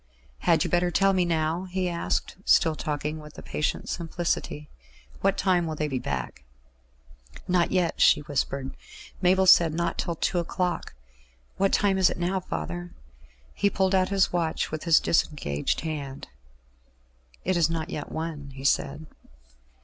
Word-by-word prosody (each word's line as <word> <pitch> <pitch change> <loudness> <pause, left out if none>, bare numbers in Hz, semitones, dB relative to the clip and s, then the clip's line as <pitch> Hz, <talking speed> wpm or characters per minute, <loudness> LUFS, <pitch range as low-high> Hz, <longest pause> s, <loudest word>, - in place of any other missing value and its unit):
"Had - - +3
you - - -2
better 175 0 +2
tell 195 +3 +3
me 185 -2 +2
now?" 165 +1 0
he 185 0 -2
asked, 170 -1 -2
still 165 -5 +4
talking 150 +1 -3
with 150 0 -13
a - - -9
patient 150 - -2
simplicity. 165 -3 -3 0.5
"What 195 0 +1
time 180 -3 +2
will 155 - -3
they 150 0 -1
be 135 -3 -2
back?" 65 - -4 1.0
"Not 180 -1 +2
yet," 180 -3 0
she - - +6
whispered. 140 -2 -3 0.5
"Mabel 190 +1 +4
said 170 -3 +6
not 170 +1 -1
till 170 -2 -1
two 175 +3 0
o'clock. 175 - -2 0.6
What 195 0 +2
time 195 -2 +2
is 185 - +5
it - - -4
now, 180 +2 0
father?" 85 - -5 0.6
He 200 - +2
pulled 190 -1 +1
out 185 -1 +3
his 195 -3 +2
watch 165 -2 -1
with 155 0 -5
his 165 -2 +6
disengaged 75 - 0
hand. 145 - -5 1.2
"It 185 - +1
is 165 -2 +3
not 165 -1 -3
yet 150 - -5
one," 160 -3 -5
he 135 - -9
said. 140 +2 0
165 Hz, 155 wpm, -26 LUFS, 150-180 Hz, 1.2 s, she